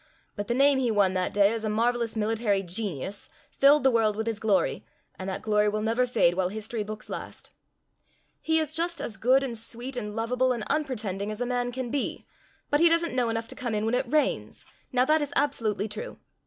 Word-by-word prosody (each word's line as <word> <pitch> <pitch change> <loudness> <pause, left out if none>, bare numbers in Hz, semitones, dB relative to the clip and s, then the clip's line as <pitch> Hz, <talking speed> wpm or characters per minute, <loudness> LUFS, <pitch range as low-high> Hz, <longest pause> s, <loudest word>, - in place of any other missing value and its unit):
But 205 0 -4
the 240 - 0
name 275 +1 +4
he 250 -2 +1
won 200 -4 +3
that 185 -1 -1
day 200 +1 +4
as 225 -1 -4
a 215 - -1
marvelous 235 +1 0
military 215 -2 0
genius 190 -1 -3 0.2
filled 285 +2 +5
the 265 - +5
world 220 -3 +2
with 220 +1 -2
his 225 -2 -2
glory, 210 -4 +1 0.4
and 190 +1 -4
that 190 - -4
glory 210 -1 +2
will 215 +1 -2
never 230 +3 +1
fade 225 -8 +3
while 180 0 0
history 220 +2 -5
books 215 +1 -6
last. - - -8 0.9
He 320 0 +2
is 310 -1 -1
just 340 +2 -1
as 220 - -4
good 260 +4 +3
and 250 -3 -3
sweet 235 +4 -4
and 210 -4 -4
lovable 250 +3 +1
and 235 -3 -4
unpretending 215 -9 -2
as 215 0 -5
a 245 - -1
man 245 0 -1
can 245 -1 -4
be, 285 - -2 0.5
but 290 - +4
he 340 +1 +6
doesn't 335 -1 +1
know 245 -2 +1
enough 225 0 -2
to - - -7
come 240 -3 -3
in 210 +1 0
when 225 - 0
it 250 0 0
rains. 305 -1 0 0.3
Now 250 -1 +3
that 310 +2 +3
is 290 - -3
absolutely 220 -8 0
true. 210 +1 -7
230 Hz, 220 wpm, -27 LUFS, 210-255 Hz, 0.9 s, he